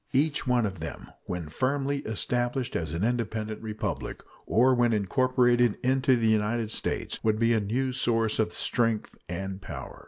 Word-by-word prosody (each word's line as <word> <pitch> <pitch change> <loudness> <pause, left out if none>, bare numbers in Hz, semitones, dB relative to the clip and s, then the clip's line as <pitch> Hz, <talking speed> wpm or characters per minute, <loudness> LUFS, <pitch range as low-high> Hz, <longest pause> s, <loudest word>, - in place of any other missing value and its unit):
Each 145 +1 +1
one 125 -2 +3
of 95 -4 -4
them, 80 - -7
when 90 -3 -4
firmly 140 - 0
established 120 +3 -1
as 80 -1 -2
an 85 - -1
independent 110 -2 -1
republic, 110 -1 -4 0.2
or 125 +4 +4
when 120 -2 +3
incorporated 120 +1 +3
into 130 0 +3
the 115 -2 0
United 110 +1 +1
States, - - -3
would 110 -1 +2
be 115 +1 +3
a 110 - +3
new 125 +6 -1
source 115 -4 +1
of 110 -1 +2
strength 115 -3 0
and 95 +2 -4
power. 75 -9 -8
115 Hz, 160 wpm, -28 LUFS, 105-125 Hz, 0.2 s, or